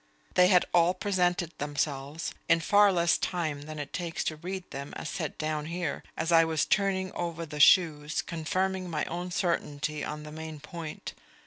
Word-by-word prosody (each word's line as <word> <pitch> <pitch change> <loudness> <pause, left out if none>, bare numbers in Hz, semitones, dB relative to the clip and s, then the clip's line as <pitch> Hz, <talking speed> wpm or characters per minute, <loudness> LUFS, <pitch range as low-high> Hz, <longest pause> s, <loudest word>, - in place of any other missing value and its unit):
They 180 - +6
had 180 -2 +5
all 175 +1 +4
presented 180 -3 0
themselves, 145 +1 -2 0.2
in 165 0 +5
far 205 +4 +5
less 170 -2 +3
time 155 -5 -2
than 155 +1 -8
it 145 -1 -6
takes 170 -2 -3
to 155 - -2
read 185 +4 -5
them 140 +1 -6
as - - -5
set 160 -5 -4
down 155 -1 -2
here, 170 -3 -3 0.2
as 160 +2 -1
I 165 -1 +7
was 160 -2 +1
turning 190 -2 +1
over 170 -1 -3
the 150 -1 -7
shoes, 155 -2 +5
confirming 185 +3 -2
my 155 -2 -1
own 175 +2 -4
certainty 155 -5 -1
on 150 0 -5
the 150 - -9
main 160 0 -7
point. 160 +1 -7
165 Hz, 180 wpm, -29 LUFS, 150-180 Hz, 0.2 s, I